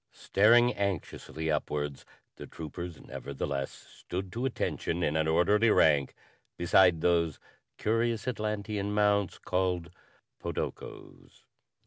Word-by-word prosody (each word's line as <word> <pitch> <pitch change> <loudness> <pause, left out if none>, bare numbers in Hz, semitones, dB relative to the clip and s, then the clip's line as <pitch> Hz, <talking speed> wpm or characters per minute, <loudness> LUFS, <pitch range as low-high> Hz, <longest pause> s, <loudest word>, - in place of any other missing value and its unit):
Staring 120 +4 +4
anxiously 85 -4 -3
upwards, 75 -1 -3 0.3
the - - -9
troopers 85 +1 -7
nevertheless 70 0 -4
stood 95 +1 -8
to 120 +3 -2
attention 90 -8 -2
in 75 - 0
an 80 0 +1
orderly 105 +8 +3
rank 75 -9 +3 0.4
beside 85 -1 +4
those 85 -3 +2 0.4
curious 115 +1 0
Atlantean 105 -3 -2
mounts 100 -2 +2
called 90 -2 -1 0.5
podokos. - - -7
90 Hz, 100 wpm, -29 LUFS, 80-105 Hz, 0.5 s, Staring